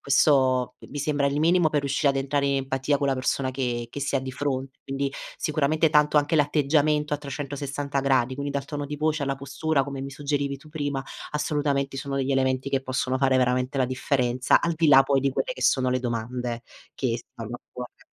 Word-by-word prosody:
questo 130 -3 +3
i - - -14
mi 145 - -6
sembra 145 0 +1
il 140 +1 0
minimo 170 0 +4
per 150 -1 +1
riuscire 140 +1 +1
ad 140 - +1
entrare 140 +1 0
i 140 0 +2
empatia 135 +1 0
con 140 - -1
la - - +3
persona 130 0 -1
che 120 -3 -2
che - - -6
si 140 - -2
ha - - 0
di 130 0 -5
fronte. 135 -1 -3
Quindi, 135 0 -2 0.2
sicuramente 155 +1 +1
tanto 150 -1 +4
anche 150 +2 +3
l'atteggiamento 150 0 +2
a - - +3
360 140 0 -3
gradi, 130 -2 +2
quindi 140 +1 -4
dal 140 -1 -2
tono 145 0 -4
di 150 +1 -5
voce 155 0 0
alla 135 0 -1
postura, 140 +1 0
come 140 -1 -5
mi 135 +1 -5
suggerivi 140 0 -2
tu 145 +3 -17
prima, 145 -3 -3 0.3
assolutamente 145 -2 0
sono 135 +1 -4
degli 135 0 0
elementi 130 0 +1
che 135 -1 0
possono 130 0 -1
fare 135 -1 +3
veramente 125 +1 +1
la 130 - +3
differenza, 130 -1 +1
al 170 -1 0
di 160 0 +2
là 135 -2 +8
poi 135 0 +2
di 135 0 +1
quelle - - -1
che - - -11
sono 130 -1 +3
le 130 - +1
domande 120 0 -3 0.3
che 120 -3 -1
stanno 115 0 -9
a - - -22
cuore. 125 -1 -9
140 Hz, 215 wpm, -25 LUFS, 130-145 Hz, 0.3 s, là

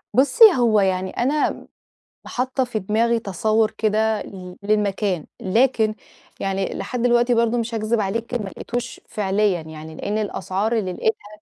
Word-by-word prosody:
بُصي، 285 - +5
هو 225 -4 +4
يعني 190 -1 +1
أنا 285 +8 -1 0.6
حاطة 260 +1 -1
في 240 -3 -3
دماغي 225 +4 +1
تصوُّر 215 +1 +1
كده 220 0 +1
لل 180 -2 -9
للمكان، 200 -4 0 0.2
لكن 220 +1 +2 0.4
يعني 195 0 -2
لحد 250 -2 -4
دلوقتي 240 0 +3
برضه، 235 +1 +2
مش 230 0 -2
هاكذِب 220 +1 0
عليكِ، 230 +5 -3
ما 210 -5 -2
لقيتوش 245 +5 -5
فعليًا 200 -3 0
يعني، 160 0 -10
لإن 210 +6 -3
الأسعار 205 +1 -2
اللي 185 -4 -2
لقِيتها 210 +1 -1
215 Hz, 140 wpm, -22 LUFS, 195-235 Hz, 0.6 s, بُصي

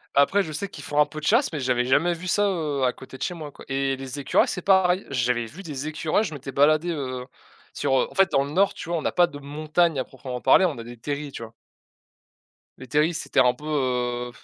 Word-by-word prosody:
Après, 165 +8 +4
je 160 - -7
sais 200 +7 -3
qu'ils 145 -6 -10
font 145 +2 -1
un 150 - +7
peu 155 +1 -8
de 150 - -7
chasse, 235 - +3
mais 155 - -3
j'avais 125 -2 +1
jamais 165 +7 +3
vu 175 +2 -7
ça, 205 +3 +2
heu, 155 -8 -1
à 125 - +2
côté 130 0 -12
de - - -23
chez 180 - -2
moi, 155 -4 -8
quoi - - -14
et 135 0 0
les 135 +1 -7
écureuils, 140 - +2
c'est 180 - -3
pareil. 190 0 +3
J'avais 125 -2 0
vu 160 - -11
des 150 -3 -5
écureuils, 155 +6 0
je 160 - -4
m'étais 135 -1 -7
baladé, 155 +5 +3
heu, 130 -5 -4 0.5
sur 135 - +1
heu, - - +1
en - - -16
fait, 195 -2 +4
dans 135 - +3
le 140 - -6
nord, 195 +4 +3
tu 170 - -8
vois, 170 - 0
on 160 - -5
a - - +1
pas 175 -1 +4
de 150 -4 -10
montagne 155 +2 0
à - - 0
proprement 130 -1 -7
parler, 190 - +6
on 155 -7 -1
a 115 - -6
des 120 +1 -10
terrils, 145 +4 -4
tu 115 - -7
vois? 115 0 -10 1.2
Les 130 - -11
terrils, 150 +6 +2
c'était - - -1
un 125 -1 +5
peu, 150 +4 -13
heu, 125 -4 -1
145 Hz, 260 wpm, -24 LUFS, 130-170 Hz, 1.2 s, un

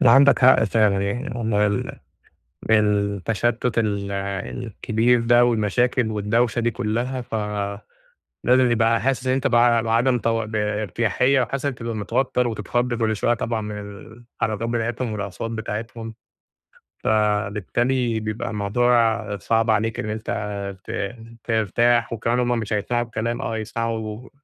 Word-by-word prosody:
لا، 120 - +6
عندك 140 +3 +6
حق 130 -3 +6
فعلًا 105 -2 +2
يعني، 120 +6 -3
والله 110 -3 +1
ال 100 -1 -2 0.7
التشتُّت 105 +3 +1
ال 100 -3 -1
الكبير 110 +4 -1
ده 120 +1 +5
والمشاكل 120 +1 +1
والدوشة 110 +3 +1
دي 120 0 +1
كلّها 120 +4 -2
فلازم 105 -3 -4 0.7
يبقى 115 -1 +3
حاسس 130 +2 -1
إن 130 - +2
أنت 135 - 0
ب - - +2
بعدَم 120 +1 +3
ت 115 - -1
بارتياحيّة 110 +3 0
وحاسس 135 +4 -2
تبقى 115 -1 -5
متوتَّر 120 +4 0
وتتخض 120 +3 -1
كل 110 -2 0
شوية 120 +3 +2
طبعًا 115 0 -2
من 105 -1 -5 0.6
الحركات 110 +1 -1
بتاعتهم 120 0 -2
والأصوات 105 +1 -4
بتاعتهم 115 +1 -5 0.9
فبالتالي 110 +3 +1
بيبقى 110 +2 -4
الموضوع 110 0 +1
صعب 115 +1 +1
عليك 110 +1 0
إن 110 - -3
أنت 110 +1 -4 0.5
ت 100 +3 -4 0.3
ترتاح 115 +1 +2
وكمان 115 +2 0
هُم 120 -1 +1
مش 110 -1 -3
هيسمَعوا 120 +3 0
الكلام، 115 +2 -3
آه 115 -4 -3
هيسمَعوا 110 +1 -4
115 Hz, 130 wpm, -22 LUFS, 105-120 Hz, 0.9 s, لا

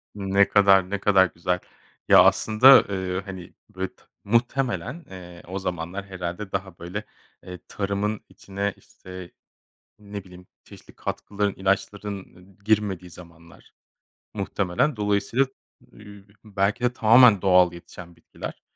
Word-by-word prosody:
Ne 100 0 +2
kadar, 95 -2 +4
ne 100 0 -2
kadar 95 -1 +4
güzel. 90 +1 -2 0.5
Ya, - - +8
aslında, 125 +5 +6
ııı, 95 -1 -3
hani, 95 -2 -10 0.2
bit 95 0 -7 0.2
muhtemelen, 125 +8 -1
eee, 90 -2 -11
o 95 +2 -5
zamanlar, 90 +1 -5
herhâlde, 95 +1 -6
daha 95 -2 -5
böyle, 90 +5 -6 0.4
eee, 90 -1 -9
tarımın 100 +1 -3
içine, 100 +1 -4
işte, 90 -1 -12 0.7
ne 100 -1 -8
bileyim, 90 -1 -15 0.2
çeşitli - - -16
katkıların, 100 -1 -3
ilaçların 100 +1 -2 0.4
i - - -29
girmediği 100 -4 0
zamanlar, 85 -1 -16 0.6
muhtemelen. 100 +8 -1
Dolayısıyla, 105 +5 +1 0.5
eee, 100 -2 -14 0.2
belki 105 +3 -1
de, 125 - +2
tamamen 115 -3 +6
doğal 90 -2 +4
yetişen 85 0 -12
bitkiler. - - -10
95 Hz, 120 wpm, -24 LUFS, 90-105 Hz, 0.7 s, Ya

